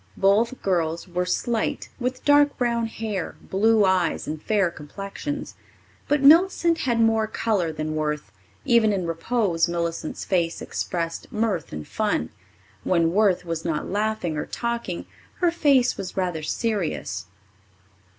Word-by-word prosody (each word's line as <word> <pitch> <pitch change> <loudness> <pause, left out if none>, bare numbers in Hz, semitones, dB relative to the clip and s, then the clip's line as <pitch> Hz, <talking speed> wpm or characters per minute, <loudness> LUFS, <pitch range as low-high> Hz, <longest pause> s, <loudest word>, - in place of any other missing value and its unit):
Both 215 +6 +2
girls 170 -2 0
were 180 0 -2
slight, 225 +4 -1
with 255 +1 -3
dark 290 0 +5
brown 235 -2 0
hair, 215 -5 -4
blue 215 +2 +3
eyes 185 -3 +1
and 155 0 -4
fair 200 -3 +1
complexions. 195 - -6 0.5
But 290 -1 +1
Millicent 335 +2 +5
had 240 -3 0
more 225 -1 +3
colour 205 -6 0
than 155 0 -3
Worth. 150 -8 -2 0.3
Even 235 -5 +4
in 185 -3 -1
repose, 170 0 0
Millicent's 170 -2 -3
face 170 -3 0
expressed 165 -2 -4
mirth 215 -6 -1
and 75 0 -6
fun; 80 +1 -1 0.5
when 170 -2 +2
Worth 195 -3 +3
was 165 -1 -3
not 160 0 -2
laughing 205 -6 -1
or - - -3
talking, 235 -7 -3 0.3
her 350 -3 +2
face 280 -7 +3
was 190 -1 -6
rather 180 -4 -1
serious. 205 +2 -2
195 Hz, 135 wpm, -24 LUFS, 165-235 Hz, 0.5 s, dark